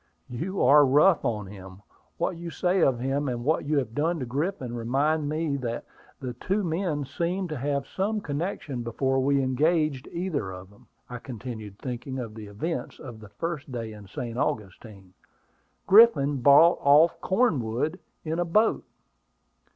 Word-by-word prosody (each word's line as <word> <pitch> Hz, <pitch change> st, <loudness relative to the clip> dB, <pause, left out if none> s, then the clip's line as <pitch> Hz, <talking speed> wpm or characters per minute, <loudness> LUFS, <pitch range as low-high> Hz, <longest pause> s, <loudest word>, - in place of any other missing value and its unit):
"You 185 Hz, +11 st, -2 dB
are 145 Hz, +3 st, +7 dB
rough 150 Hz, +6 st, +4 dB
on 105 Hz, -3 st, -2 dB
him. 95 Hz, 0 st, -12 dB, 0.3 s
What 185 Hz, -, -1 dB
you 170 Hz, 0 st, -7 dB
say 180 Hz, +2 st, 0 dB
of 130 Hz, -6 st, +3 dB
him, 135 Hz, +2 st, -1 dB
and 120 Hz, -1 st, -4 dB
what 155 Hz, +1 st, +1 dB
you 150 Hz, +1 st, 0 dB
have 125 Hz, -5 st, -1 dB
done 165 Hz, +6 st, 0 dB
to 130 Hz, -, -3 dB
Griffin, 135 Hz, 0 st, -3 dB
remind 145 Hz, +6 st, 0 dB
me 155 Hz, -2 st, -1 dB
that 120 Hz, -3 st, -4 dB, 0.3 s
the 125 Hz, -3 st, -5 dB
two 195 Hz, -, -2 dB
men 165 Hz, -4 st, -1 dB
seemed 175 Hz, +6 st, -2 dB
to 155 Hz, -, -4 dB
have 140 Hz, +1 st, -1 dB
some 205 Hz, +8 st, -2 dB
connection 150 Hz, -5 st, -4 dB
before 130 Hz, +3 st, 0 dB
we 140 Hz, +1 st, +2 dB
engaged 150 Hz, +1 st, +1 dB
either 170 Hz, -, -3 dB
of 95 Hz, +1 st, -10 dB
them," 100 Hz, -, -21 dB, 0.2 s
I 125 Hz, -1 st, -7 dB
continued, 110 Hz, -5 st, -8 dB
thinking 125 Hz, +2 st, -5 dB
of 115 Hz, -4 st, -5 dB
the 110 Hz, -1 st, -9 dB
events 115 Hz, +12 st, -4 dB
of 120 Hz, -4 st, -10 dB
that 105 Hz, -1 st, -14 dB
first 165 Hz, -5 st, -4 dB
day 115 Hz, -3 st, -5 dB
in 105 Hz, -2 st, -12 dB
St. 120 Hz, +4 st, -5 dB
Augustine. 105 Hz, -7 st, -4 dB, 0.7 s
"Griffin 190 Hz, -10 st, +6 dB
brought 145 Hz, +6 st, +6 dB
off 150 Hz, +4 st, +5 dB
Cornwood 160 Hz, -, 0 dB, 0.3 s
in 160 Hz, +2 st, -2 dB
a -, -, +2 dB
boat." 215 Hz, +7 st, +2 dB
140 Hz, 165 wpm, -26 LUFS, 120-165 Hz, 0.7 s, are